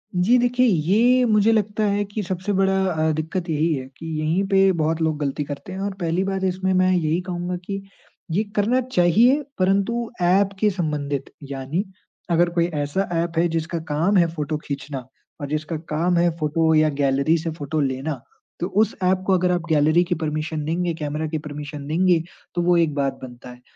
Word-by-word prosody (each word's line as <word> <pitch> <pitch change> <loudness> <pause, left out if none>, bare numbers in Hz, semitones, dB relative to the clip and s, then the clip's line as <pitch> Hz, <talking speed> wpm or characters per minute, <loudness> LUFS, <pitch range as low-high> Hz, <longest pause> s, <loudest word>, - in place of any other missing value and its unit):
जी 195 +8 +4
देखिए 245 +1 +2
ये 220 +8 +3
मुझे 215 -1 +4
लगता 215 -1 0
है 205 +1 +1
कि 205 +2 -4
सबसे 185 +2 -3
बड़ा 195 0 +2 0.2
अ, 160 -1 +1
दिक्कत 160 +3 -3
यही 160 +1 +1
है 130 -2 -3
कि 165 - -9
यहीं 160 +5 +1
पे 195 -1 +4
बहुत 160 +1 0
लोग 160 -1 +1
गलती 145 +1 -2
करते 145 +6 -7
हैं 190 - -5
और 200 0 -2
पहली 170 +2 0
बात 195 0 -2
इसमें 190 0 0
मैं 185 0 +3
यही 170 -2 +1
कहूँगा 180 0 -4
कि 195 0 -4 0.5
ये 200 +6 +1
करना 235 +5 +2
चाहिए, 240 - +3 0.2
परंतु 200 +5 +1
एप 190 +3 +4
के 215 - +3
संबंधित। 150 -6 -3 0.2
यानी 140 +8 -2 0.5
अगर 170 +1 +3
कोई 170 -1 +1 0.2
ऐसा 190 +8 -1 0.2
ऐप 165 -1 -5
है 170 +1 +4
जिसका 165 +1 -2
काम 165 +7 +2
है 170 -2 +5
फ़ोटो 150 0 -2
खींचना 140 -2 -5 0.4
और 145 - -3
जिसका 155 +2 -2
काम 170 +3 +1
है 175 0 +4
फ़ोटो 160 +1 +2
या 155 0 +4
गैलरी 140 +4 +2
से 165 +1 -3
फ़ोटो 155 -1 -3
लेना। 135 +3 -2 0.4
तो 175 - -1
उस 215 +3 +1
ऐप 185 +1 +2
को 190 - +4
अगर 180 0 +2
आप 175 -1 +1
गैलरी 155 +3 +4
की 175 0 -1
परमिशन 155 -1 -3
देंगे, 170 +2 -1
कैमरा 155 0 -3
की 155 0 -2
परमिशन 145 -1 -7
देंगे, 175 +2 +3 0.4
तो 175 - +1
वो 175 0 +3
एक 165 -3 +2
बात 140 -1 -1
बनता 125 -1 -10
है। 125 0 -13
170 Hz, 195 wpm, -22 LUFS, 155-190 Hz, 0.5 s, है